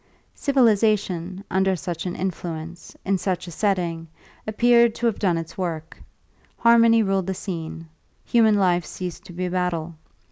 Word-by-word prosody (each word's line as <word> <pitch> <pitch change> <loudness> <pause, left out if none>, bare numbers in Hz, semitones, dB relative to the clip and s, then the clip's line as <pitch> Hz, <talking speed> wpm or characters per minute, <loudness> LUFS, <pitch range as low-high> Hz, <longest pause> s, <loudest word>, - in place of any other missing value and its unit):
Civilisation, 205 - +1
under 190 0 +2
such 175 0 -5
an 180 - -4
influence, 170 -2 -5
in 195 -1 +1
such 180 -1 -2
a 175 - -8
setting, 170 -3 -1 0.4
appeared 235 +1 +4
to 240 - -3
have 230 -3 +1
done 180 -5 +1
its 165 +3 -7
work; 165 -3 -4 0.6
harmony 230 -1 +5
ruled 195 -2 0
the 190 - -2
scene; 165 -3 -6 0.4
human 220 -3 +4
life 180 -3 +2
ceased 180 +2 -7
to 175 - -11
be 180 +2 -3
a 180 - -3
battle. 175 -2 -2
185 Hz, 150 wpm, -23 LUFS, 170-215 Hz, 0.6 s, harmony